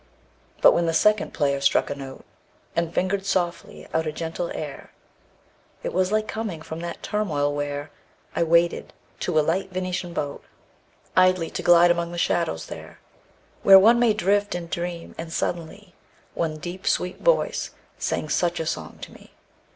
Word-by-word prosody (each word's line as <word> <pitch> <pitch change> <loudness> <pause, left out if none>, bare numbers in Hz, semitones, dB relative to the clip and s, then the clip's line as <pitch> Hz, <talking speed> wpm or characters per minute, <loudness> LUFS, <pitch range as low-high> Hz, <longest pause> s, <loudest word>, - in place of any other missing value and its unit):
II. - - -26
But - - +9
when 170 0 +1
the 165 - 0
second 210 -1 +3
player 140 -2 0
struck 140 - +2
a - - -2
note 135 -1 -9 0.5
And 170 -1 0
fingered 190 +2 0
softly 185 -3 -2
out 160 0 0
a - - -1
gentle 165 +2 -4
air 150 -3 -7 0.9
It - - -3
was 185 +1 +1
like 215 0 +1
coming 210 -9 -4
from 160 0 -7
that 170 0 -6
turmoil 155 -9 0
where 145 0 -4 0.4
I - - 0
waited, 170 +1 +2 0.3
to 175 -3 -1
a 150 - +2
light 185 +4 -1
Venetian 185 -1 -3
boat, 145 -4 -4 0.7
Idly 185 -2 +3
to - - -4
glide 175 0 +6
among 170 0 -1
the 175 - -6
shadows, 165 - 0
there - - -10 0.6
Where 195 0 +9
one 225 +5 +6
may 235 -3 +4
drift 205 0 +1
and 170 -1 -6
dream; 170 -1 -4
and 165 0 -6
suddenly 175 +4 -4 0.4
One 155 -2 -2
deep 175 +4 -7
sweet 180 +1 0
voice - - +2 0.3
sang - - -2
such 175 +2 0
a 160 - -2
song - - -4
to - - -8
me. - - -17
170 Hz, 170 wpm, -24 LUFS, 160-185 Hz, 0.9 s, But